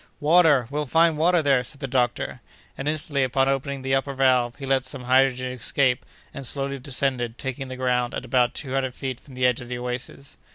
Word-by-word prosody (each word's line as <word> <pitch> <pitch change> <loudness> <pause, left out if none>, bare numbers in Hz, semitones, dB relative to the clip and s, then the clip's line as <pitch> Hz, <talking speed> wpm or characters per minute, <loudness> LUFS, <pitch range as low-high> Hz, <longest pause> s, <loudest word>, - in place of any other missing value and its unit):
"Water! 155 -4 +5
we'll 150 0 -2
find 165 +3 +4
water 170 +2 +3
there!" 135 -3 +3
said 140 +3 -3
the 140 - -4
doctor. 125 -2 -1 0.3
And, 135 - -5
instantly, 150 -2 0
opening 135 +1 0
the 135 0 -1
upper 135 +1 0
valve, 125 -3 +2
he 140 - -8
let 135 -1 +2
some 135 -2 -5
hydrogen 130 0 +2
escape, 125 +1 0 0.3
and 140 - -7
slowly 140 +1 -2
descended, 125 -3 -2
taking 130 0 -5
the 130 - -6
ground 125 -1 0
at - - -5
about 125 -1 +2
two 135 -3 -5
hundred 130 -2 -1
feet 130 -3 -4
from 135 -1 -15
the 125 0 +1
edge 125 -1 +2
of 120 - -10
the 125 - -3
oasis. 125 +3 -6
135 Hz, 205 wpm, -24 LUFS, 125-140 Hz, 0.3 s, Water